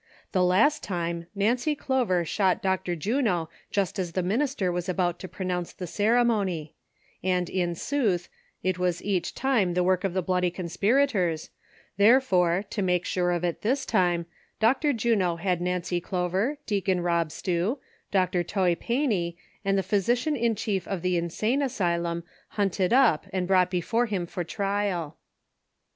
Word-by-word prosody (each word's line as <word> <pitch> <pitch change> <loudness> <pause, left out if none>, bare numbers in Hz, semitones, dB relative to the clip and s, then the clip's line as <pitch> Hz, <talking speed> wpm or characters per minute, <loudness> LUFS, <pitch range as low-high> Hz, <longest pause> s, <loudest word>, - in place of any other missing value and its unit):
The 185 -2 +2
last 210 +12 +3
time 170 -2 -3
Nancy 240 +9 +1
Clover 245 -12 0
shot 185 +2 +1
Dr. 190 -2 0
Juno 190 - 0 0.2
just 200 -1 -1
as 175 -3 -3
the 185 - 0
minister 215 -1 0
was 175 +1 -3
about 175 -1 0
to 185 - -6
pro 190 0 -6
nounce 180 -1 -2
the 185 - -4
ceremony; 205 -5 +1 0.5
and 180 -1 +1
in 175 -2 -1
sootli, 205 - 0 0.4
it 185 -1 0
was 180 -1 0
eacli 185 -4 -1
time 225 -10 +1
tlie 180 - +2
work 185 +1 +2
of 190 -2 -1
the 185 - +1
bloody 180 0 +1
conspirators, 185 - 0 0.5
therefore, 200 -5 +4
to 210 - -2
make 180 -1 +1
sure 180 -1 0
of 175 -1 0
it 175 -2 -2
this 265 +5 0
time, 175 -2 +1 0.3
Dr. 260 +7 +3
Juno 220 -8 +1
had 180 0 -1
Xancy 180 0 -1
Clover, 185 - -1
Deacon 195 -3 0
Rob 170 -2 0
Slew, 180 - -1 0.3
Dr. 185 -2 +1
Toy 180 0 +1
Fancy 205 - -1 0.3
and 195 -1 +1
tlie 195 - 0
physician 240 - +1
in 235 -3 +1
chief 195 -3 -2
of 185 -3 -3
the 180 0 +1
insane 215 - 0
asylum 170 -9 -1 0.2
hunted 195 -3 0
up 240 - +4
and 185 -1 -1
brought 185 -1 +4
before 225 +7 0
him 195 -5 -2
for 175 +1 -4
trial. 195 -4 -2
185 Hz, 155 wpm, -26 LUFS, 175-215 Hz, 0.5 s, therefore